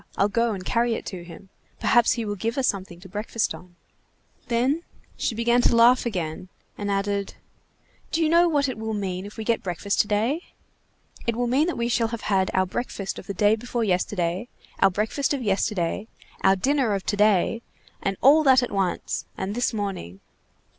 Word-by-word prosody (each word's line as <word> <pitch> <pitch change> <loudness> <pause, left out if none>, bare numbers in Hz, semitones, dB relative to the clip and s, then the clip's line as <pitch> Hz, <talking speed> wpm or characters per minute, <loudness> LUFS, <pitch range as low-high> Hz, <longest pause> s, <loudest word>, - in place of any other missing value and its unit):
I'll 200 - +3
go 230 +2 +1
and 185 -2 -6
carry 235 +2 +1
it - - -6
to 180 -2 -6
him. 180 +3 -12 0.3
Perhaps 240 -1 +4
he 230 -2 -3
will 205 - -2
give 225 +5 -3
us 265 - +2
something 190 -3 -3
to 190 - -11
breakfast 210 +2 -2
on." 175 +2 -13 0.7
Then 255 +7 +1 0.3
she 230 - -2
began 235 +2 +3
to 240 - +3
laugh 240 +2 +5
again, 180 -3 -4 0.3
and 205 0 -4
added:— 200 0 -1 0.8
"Do 330 - +1
you - - +3
know 340 +2 +5
what 290 -3 +2
it 255 -4 -4
will 220 0 -3
mean 190 -1 -3
if 205 - -13
we 220 - -4
get 230 +1 +1
a - - -26
breakfast 190 +2 0
today? 220 +9 0 0.9
It 235 - +1
will 245 +1 0
mean 265 +7 +2
that 350 - -2
we 235 0 0
shall 235 -1 +1
have 230 0 -5
had 190 -1 +2
our 185 0 +3
breakfast 195 0 -4
of - - -12
the 200 - -4
day 210 +3 +4
before 240 +1 -3
yesterday, 180 0 -1 0.3
our 195 - +6
breakfast 220 +9 -1
of 265 - -4
yesterday, 200 -1 0 0.3
our 190 0 +5
dinner 260 0 +1
of 195 - -4
to 205 - 0
day, 210 +2 +3 0.4
and 195 -1 -1
all 290 +5 +7
that 260 -4 +5
at - - -3
once, 195 -3 -1
and 190 +2 -3
this 245 +2 0
morning. 195 - -4
215 Hz, 200 wpm, -25 LUFS, 195-240 Hz, 0.9 s, all